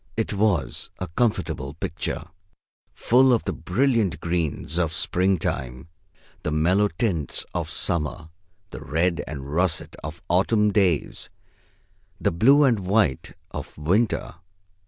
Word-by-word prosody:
It 110 -1 -1
was 100 - 0
a - - -4
comfortable 85 - -1
picture, 80 0 -4 0.7
full 130 +2 +4
of 120 - +2
the - - -2
brilliant 115 -9 +1
greens 85 -1 -2
of 80 -3 0
springtime, 80 -9 0 0.5
the - - -2
mellow 90 +7 +3
tints 85 -5 -1
of - - -2
summer, 80 0 -1 0.4
the - - -8
red 85 +3 0
and 70 -2 -6
russet 85 -1 0
of 80 +2 -7
autumn 105 +4 +3
days, 95 -7 +1 0.9
the - - +1
blue 135 - +5
and 125 -6 +3
white 95 - +1 0.2
of - - -7
winter. 90 +4 0
90 Hz, 120 wpm, -24 LUFS, 80-105 Hz, 0.9 s, blue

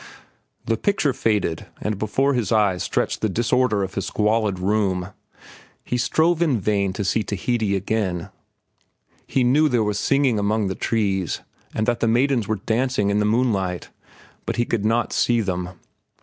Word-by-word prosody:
The 115 0 0
picture 155 - +1
faded, 105 -9 -1
and 105 -2 -3
before 135 +7 +1
his 120 -6 -1
eyes 100 -5 +2
stretched - - -1
the 110 - +1
disorder 115 0 +1
of 95 0 -5
his 95 - -3
squalid 105 -2 +1
room. 95 -1 0 0.7
He - - -3
strove 160 +8 +2
in 145 -9 +2
vain 100 -1 0
to 100 +1 -3
see 105 +4 +1
Tahiti 105 +1 -1
again. 95 -3 -2 1.0
He 130 - +1
knew 145 +5 +4
there 120 -4 +2
was 105 -1 -1
singing 135 -6 +2
among 105 0 0
the - - -1
trees 95 -5 -1 0.3
and 110 - 0
that 120 0 0
the 115 - +1
maidens 120 -1 +2
were 110 - 0
dancing 115 -3 +1
in 105 - +1
the 105 - +2
moonlight, 105 -6 0 0.6
but - - -1
he 120 - +1
could 110 -3 -1
not 115 +2 +1
see 120 -1 +2
them. 90 -4 -2
110 Hz, 165 wpm, -22 LUFS, 100-120 Hz, 1.0 s, knew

